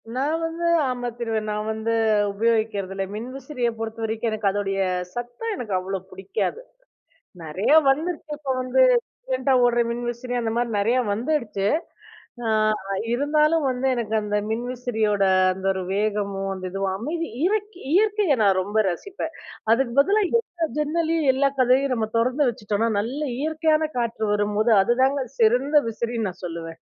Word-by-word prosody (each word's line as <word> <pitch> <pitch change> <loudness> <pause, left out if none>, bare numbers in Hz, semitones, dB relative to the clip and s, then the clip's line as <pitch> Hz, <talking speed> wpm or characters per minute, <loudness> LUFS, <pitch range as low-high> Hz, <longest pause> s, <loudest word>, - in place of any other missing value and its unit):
நான் 285 +5 0
வந்து, 330 +1 -2 0.2
ஆமா 245 -1 -3
திருவ 225 -2 -1
நான் 210 0 -2
வந்து 220 +1 -2 0.4
உபயோகிக்கிறது 215 -3 0
இல்ல. 195 - -1
மின்விசிறிய 255 +2 -4
பொறுத்த 225 0 -5
வரைக்கும் 225 +1 -1
எனக்கு 215 -1 -1
அதோடைய 195 -1 -2 0.4
சத்தம் 245 - -4
எனக்கு 225 - -5
அவ்வளோ 190 +1 -3
புடிக்காது. 195 - -3 0.8
நெறையா 185 - +2
வந்துருச்சு 310 +2 -1
இப்ப 285 -2 -3
வந்து 255 - +2 0.5
சயலன்ட்டா - - +1
ஓடுற 240 0 +3
மின்விசிறி 240 +1 -4
அந்த 230 -2 -1
மாரி 240 0 0
நறையா 230 +5 +2
வந்துடுச்சு. 235 -4 -1 0.8
அ - - 0 0.6
இருந்தாலும் 300 +4 +2
வந்து, 255 +1 -1
எனக்கு 220 -2 -2
அந்த 210 0 -1
மின்விசிறியோட 225 -3 -1 0.3
அந்த 190 +1 -9
ஒரு 190 -1 -4
வேகமோ, 200 -1 -1
அந்த 185 -1 -8
இதுவும், 195 0 -1
அமைதி, 330 +8 -3 0.2
இருக் 415 0 -1
இயற்கையை 410 -5 +3
நான் 195 -2 +4
ரொம்ப 205 +3 -5
ரசிப்பேன். 325 - -5 0.4
அதுக்கு 240 0 +1
பதிலா 405 +9 +3
எல்லா 360 -8 0
ஜன்னலையும், 320 0 0
எல்லா 275 +1 +2
கதவயும் 255 +1 +3
நம்ம 220 -2 -1
தொறந்து 255 +4 +2
வச்சிட்டோன்னா, 215 0 -1
நல்ல 245 +8 -4 0.2
இயற்கையான 315 0 +1
காற்று 230 -2 -1
வரும்போது 210 +2 +1
அதுதாங்க 260 +6 +2 0.2
சிறந்த 250 +7 +3
விசிறின்னு 230 -1 -2
நான் 180 - -16
சொல்லுவேன். 165 -1 -6
240 Hz, 140 wpm, -24 LUFS, 210-290 Hz, 0.8 s, நான்